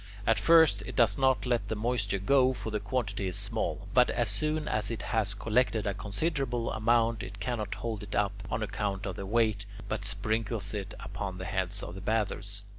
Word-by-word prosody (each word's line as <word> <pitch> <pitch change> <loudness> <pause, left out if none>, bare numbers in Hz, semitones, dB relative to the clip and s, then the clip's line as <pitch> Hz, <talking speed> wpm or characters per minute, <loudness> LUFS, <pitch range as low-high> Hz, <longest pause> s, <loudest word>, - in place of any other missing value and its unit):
At 115 -3 +3
first 155 -3 +6
it - - -6
does 115 -3 +4
not 130 -5 +3
let 120 -5 0
the 110 - -2
moisture 105 -2 0
go, 130 +6 +4
for 110 - -5
the 105 - 0
quantity 105 -2 -2
is 90 - -3
small; - - -2
but - - +5
as - - 0
soon 155 0 -1
as 110 - 0
it 115 -2 -4
has 105 -3 +1
collected 110 0 +1
a 100 - 0
considerable 120 - -1
amount, 115 0 +2
it 100 +2 -8
cannot 110 -1 -2
hold 110 0 -4
it 100 -1 -6
up, 100 -1 +2 0.2
on 110 - -1
account 100 -1 -2
of 95 -3 -3
the 95 - -6
weight, 110 -2 +1 0.2
but - - -2
sprinkles 110 -2 -1
it 100 -2 -4
upon 95 -2 -5
the 95 - -5
heads 95 0 -2
of 85 - -6
the 95 - -8
bathers. 100 -1 -1
105 Hz, 200 wpm, -30 LUFS, 100-115 Hz, 0.2 s, first